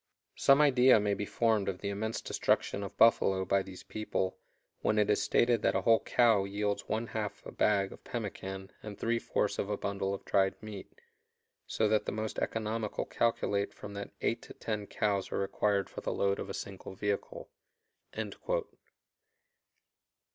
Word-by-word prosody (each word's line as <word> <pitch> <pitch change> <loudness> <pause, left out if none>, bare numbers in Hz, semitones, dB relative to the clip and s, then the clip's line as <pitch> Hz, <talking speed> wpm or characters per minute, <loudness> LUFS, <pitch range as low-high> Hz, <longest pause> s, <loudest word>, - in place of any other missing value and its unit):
Some 135 +2 +5
idea 130 -5 +6
may 105 -1 +1
be 100 0 -3
formed 110 -4 +1
of 95 - -3
the 100 - -2
immense 110 +3 -2
destruction - - 0
of 100 0 -7
buffalo 95 -4 +4
by 100 +2 +2
these 95 -1 -10
people 100 -3 -3 0.4
when 110 - +1
it 105 0 +3
is 105 - +2
stated 120 -2 +3
that - - +2
a - - +2
whole 115 -1 +5
cow 115 -5 +3
yields 100 +1 -2
one 110 +2 0
half 110 -2 -4
a - - -7
bag 100 -2 +2
of - - -15
pemmican 95 -4 -5
and 105 -2 -8
three 115 0 0
fourths 105 - -1
of 100 - -1
a 105 - -1
bundle 100 -1 -2
of 100 - -5
dried 95 -1 +2
meat; 105 -3 -8 0.8
so 110 - +1
that 110 0 +1
the - - 0
most 110 0 -3
economical 110 -1 -2
calculate 105 -3 0
that - - -25
from 100 -1 -7
eight - - 0
to - - -12
ten 105 -2 -3
cows 100 -3 -1
are - - -1
required 100 0 +1
for - - -8
the - - -2
load 100 0 +1
of 100 - -5
a - - -4
single 95 -1 -7
vehicle." 100 0 -3
105 Hz, 175 wpm, -31 LUFS, 100-110 Hz, 0.8 s, idea